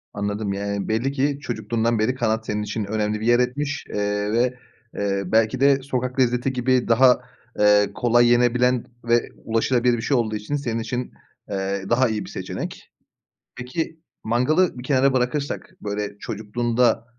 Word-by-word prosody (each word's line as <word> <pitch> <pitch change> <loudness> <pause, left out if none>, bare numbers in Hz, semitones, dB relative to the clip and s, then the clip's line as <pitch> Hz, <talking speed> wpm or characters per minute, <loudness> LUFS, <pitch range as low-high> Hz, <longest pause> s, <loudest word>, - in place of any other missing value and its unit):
Anladım, 100 0 -2
yani, 100 0 -3
belli 120 +5 0
ki 140 +1 0
çocukluğundan 115 -2 -1
beri 125 +4 +1
kanat 110 -2 0
senin 105 0 -2
için 105 0 -3
önemli 105 0 -1
bir - - -3
yer 120 +1 +4
etmiş, 140 +3 -1
eee, 105 0 -1
ve, 120 +2 +2 0.4
eee, 100 -1 -1
belki 110 +6 +2
de 140 0 +4
sokak 130 -1 -3
lezzeti 125 +1 +1
gibi 125 0 +1
daha, 125 +2 +5 0.4
eee, 105 -1 +5
kolay 120 0 +4
yenebilen 125 +1 +3 0.2
ve 120 0 +2 0.2
ulaşılabilir 120 +2 +2
bir 115 - -4
şey 135 +1 +1
olduğu 110 -2 0
için 105 +8 -3
senin 120 -5 -2
için, 125 +2 -4 0.4
eee, 95 0 -2
daha 120 +1 +3
iyi 110 -1 -3
bir - - -10
seçenek. - - -6 0.7
Peki, 160 +6 -4 0.2
mangalı 130 +8 +2
bir 125 - -6
kenara 135 0 +3
bırakırsak 130 +3 -2
böyle 105 0 -4
çocukluğunda, 115 +3 0
120 Hz, 155 wpm, -23 LUFS, 105-125 Hz, 0.7 s, daha